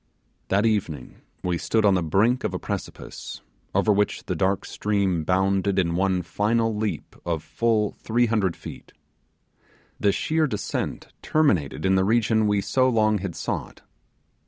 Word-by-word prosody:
That 100 Hz, +3 st, +2 dB
evening 95 Hz, -, -2 dB, 0.2 s
we 90 Hz, -1 st, -1 dB
stood 110 Hz, -1 st, +1 dB
on 100 Hz, -, +5 dB
the 90 Hz, -, +2 dB
brink 105 Hz, +10 st, +2 dB
of 95 Hz, -4 st, -2 dB
a -, -, -2 dB
precipice, -, -, -6 dB, 0.3 s
over 105 Hz, -, +4 dB
which 105 Hz, +1 st, 0 dB
the -, -, -2 dB
dark 95 Hz, +1 st, 0 dB
stream 100 Hz, -5 st, 0 dB
bounded 95 Hz, +2 st, +1 dB
in 85 Hz, -3 st, +1 dB
one 95 Hz, 0 st, +1 dB
final 110 Hz, +5 st, 0 dB
leap 105 Hz, 0 st, -3 dB
of 85 Hz, -3 st, -2 dB
full 110 Hz, -3 st, +1 dB
300 110 Hz, -6 st, +1 dB
feet. -, -, -11 dB, 1.1 s
The 100 Hz, -, +3 dB
sheer 155 Hz, +8 st, +1 dB
descent 105 Hz, -7 st, -4 dB
terminated 95 Hz, -, +1 dB
in 95 Hz, -, +3 dB
the 95 Hz, 0 st, +3 dB
region 110 Hz, +1 st, +2 dB
we 105 Hz, -1 st, +2 dB
so 130 Hz, +6 st, +2 dB
long 110 Hz, -3 st, +2 dB
had 95 Hz, -2 st, -5 dB
sought. -, -, -5 dB
100 Hz, 150 wpm, -24 LUFS, 95-110 Hz, 1.1 s, on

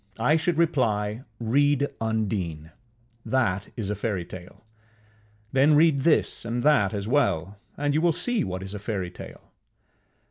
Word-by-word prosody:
I 150 Hz, -, +3 dB
should 165 Hz, +1 st, 0 dB
reply, 115 Hz, -9 st, +1 dB, 0.2 s
Read 140 Hz, +4 st, +2 dB, 0.2 s
Undine: 95 Hz, -8 st, -2 dB, 0.5 s
that 105 Hz, -7 st, 0 dB
is 105 Hz, -3 st, -3 dB
a -, -, -1 dB
fairytale; 95 Hz, -2 st, -6 dB, 0.9 s
then 140 Hz, +3 st, +4 dB
read 155 Hz, -2 st, +4 dB
this 155 Hz, +3 st, +1 dB
and 120 Hz, +1 st, -3 dB
that 140 Hz, -11 st, +4 dB
as 100 Hz, 0 st, -4 dB
well, 105 Hz, -, 0 dB, 0.2 s
and 145 Hz, 0 st, 0 dB
you 155 Hz, -, +2 dB
will 170 Hz, 0 st, +4 dB
see 245 Hz, +8 st, 0 dB
what 95 Hz, 0 st, -4 dB
is 95 Hz, +1 st, -7 dB
a 105 Hz, -, -5 dB
fairytale. 95 Hz, -4 st, -6 dB
115 Hz, 140 wpm, -25 LUFS, 100-145 Hz, 0.9 s, then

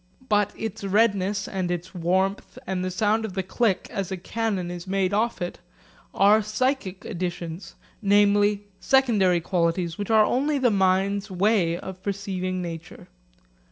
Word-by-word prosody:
But 210 Hz, -1 st, +2 dB
its 220 Hz, -3 st, -5 dB
redness 200 Hz, -1 st, +1 dB
and 185 Hz, -2 st, -2 dB
its 175 Hz, +2 st, -4 dB
warmth, 190 Hz, +5 st, -1 dB
and 190 Hz, -5 st, -2 dB
the 185 Hz, -, -1 dB
sound 215 Hz, +4 st, +1 dB
of 215 Hz, -4 st, -5 dB
the 190 Hz, 0 st, -2 dB
click 195 Hz, +1 st, 0 dB
as 195 Hz, -2 st, -3 dB
a 190 Hz, -, -2 dB
cannon 195 Hz, -2 st, -2 dB
is 175 Hz, +1 st, -7 dB
made 195 Hz, 0 st, 0 dB
off 220 Hz, -2 st, 0 dB
it 175 Hz, -, -5 dB, 0.5 s
are 205 Hz, +3 st, +5 dB
psychic 215 Hz, -2 st, -2 dB
additions, 175 Hz, -3 st, -5 dB, 0.3 s
namely, 205 Hz, 0 st, +3 dB, 0.2 s
secondary 210 Hz, -10 st, +3 dB
qualities 170 Hz, 0 st, -1 dB
which 205 Hz, -, -4 dB
are 220 Hz, -1 st, +5 dB
only 285 Hz, +6 st, +1 dB
the 255 Hz, -3 st, +3 dB
mind's 195 Hz, +1 st, +1 dB
way 185 Hz, -3 st, +2 dB
of 185 Hz, 0 st, -8 dB
perceiving 185 Hz, -2 st, -3 dB
nature. 165 Hz, 0 st, -8 dB
195 Hz, 150 wpm, -25 LUFS, 185-210 Hz, 0.5 s, are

